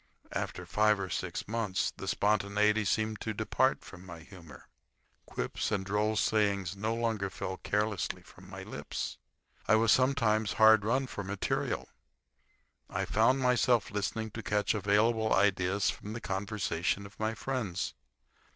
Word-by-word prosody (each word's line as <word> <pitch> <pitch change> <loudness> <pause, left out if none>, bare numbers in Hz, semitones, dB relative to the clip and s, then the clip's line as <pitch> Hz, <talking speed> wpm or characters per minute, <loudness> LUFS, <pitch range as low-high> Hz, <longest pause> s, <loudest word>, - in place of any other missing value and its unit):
After 90 - -4
five 105 +3 +3
or 95 -2 -4
six - - -3
months 105 -3 -1
the 95 - -7
spontaniety 105 +1 +2
seemed 110 +2 0
to 110 -2 -3
depart 130 +5 +1
from 95 -1 -11
my 85 -3 -10
humor. 85 -2 -14 0.6
Quips - - -3
and 100 -3 -1
droll 105 +2 0
sayings 100 -4 +1
no 110 +3 -1
longer 110 -4 -1
fell 95 0 -5
carelessly 105 -4 -1
from - - -16
my - - -8
lips. - - -5 0.5
I 110 - +6
was 110 0 +4
sometimes 115 -7 +2
hard 110 -1 +6
run 130 +5 +1
for 105 -5 -6
material. 100 +1 -2 1.0
I - - -2
found 130 +5 +3
myself 125 -2 +3
listening 105 +2 -2
to 115 - -6
catch 105 -1 +1
available 110 +2 +2
ideas 100 0 +2
from 105 - -8
the 120 - -4
conversation 100 -2 -2
of 100 - -14
my 110 +1 -1
friends. 125 -11 -3
105 Hz, 145 wpm, -31 LUFS, 100-110 Hz, 1.0 s, I